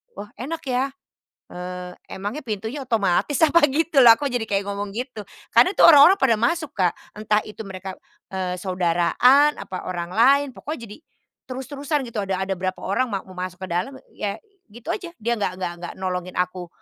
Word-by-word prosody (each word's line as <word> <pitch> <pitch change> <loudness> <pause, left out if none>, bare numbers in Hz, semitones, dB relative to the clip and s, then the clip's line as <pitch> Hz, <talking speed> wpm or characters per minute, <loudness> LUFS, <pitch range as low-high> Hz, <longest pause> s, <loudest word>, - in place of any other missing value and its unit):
"Wah 210 - -9
enak 315 +6 -5
ya? 260 0 0 0.6
Eee, 180 0 -7 0.2
emangnya 205 +10 -5
pintunya 225 +4 -5
otomatis 225 +3 +1
apa," 340 +3 +4
gitu 300 -1 +3
loh. 240 - +9
Aku 290 - -4
jadi 245 -4 -1
kayak 200 0 0
ngomong 200 0 -4
gitu. 240 +1 -6 0.3
Karena 365 - +6
itu - - +7
orang-orang 335 +4 +8
pada 265 -8 +3
masuk 275 +8 0
Kak, 180 -4 0 0.2
entah 210 0 0
itu 215 +1 -9
mereka, 190 -2 -7 0.4
eee, 185 -1 -2
saudaraan, 185 - +3
apa 185 - -7
orang 175 -1 -4
lain, 280 +4 +5
pokoknya 245 -3 -7
jadi 210 - -10 0.5
terus-terusan 275 +3 -3
gitu 220 - -4
ada 190 0 -2
ada 190 -1 -2
berapa 185 0 -2
orang 205 +7 +1
ma 195 -4 -3
mau 185 -1 -14
masuk 185 0 -5
ke - - -4
dalam 185 +11 -2 0.2
ya 200 -1 -3 0.3
gitu 225 +2 -7
aja 350 -4 -6
dia 235 +1 -3
nggak 185 -2 -1
nggak 180 -2 -3
nggak 175 - -7
nolongin 185 -1 -4
aku 180 0 -2
210 Hz, 180 wpm, -23 LUFS, 185-265 Hz, 0.6 s, loh